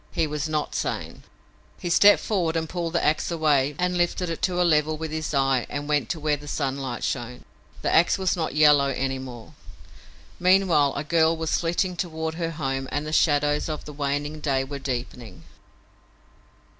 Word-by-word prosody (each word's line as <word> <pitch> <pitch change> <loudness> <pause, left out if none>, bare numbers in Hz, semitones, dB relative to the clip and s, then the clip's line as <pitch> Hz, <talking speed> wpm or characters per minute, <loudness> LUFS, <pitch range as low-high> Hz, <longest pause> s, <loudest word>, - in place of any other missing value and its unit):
He 165 - 0
was 150 0 -3
not 155 -1 -2
sane. - - -4 0.6
He 175 - -3
stepped 205 +4 +6
forward 175 -6 0
and 160 -1 -1
pulled 170 -1 -4
the 170 - +1
ax 155 +1 +1
away 150 -4 +1
and 180 0 0
lifted 175 0 0
it 165 - -5
to 180 -1 0
a 180 - +3
level 155 -1 +2
with 160 0 -5
his 155 0 -3
eyes 135 -3 +1
and 145 0 -4
went 145 -6 0
to 160 - -3
where 150 -1 0
the 145 +1 -12
sunlight 135 -4 -3
shone. 125 -1 -4 0.4
The - - 0
ax 170 - +4
was 190 -2 0
not 160 -4 -3
yellow 150 -2 +5
any 135 -1 -2
more. 125 -3 -10 0.9
Meanwhile 180 -6 +3
a 140 - -2
girl 160 +1 +2
was 160 -1 -1
flitting 175 +2 0
toward 160 -2 -3
her 165 0 -3
home 135 -4 -3
and 145 +1 -2
the 155 - -5
shadows 145 -1 +2
of 155 - -5
the 150 - -9
waning 145 +1 -2
day 135 -3 0
were 140 +1 -6
deepening. 125 -3 -6
150 Hz, 185 wpm, -25 LUFS, 140-165 Hz, 0.9 s, stepped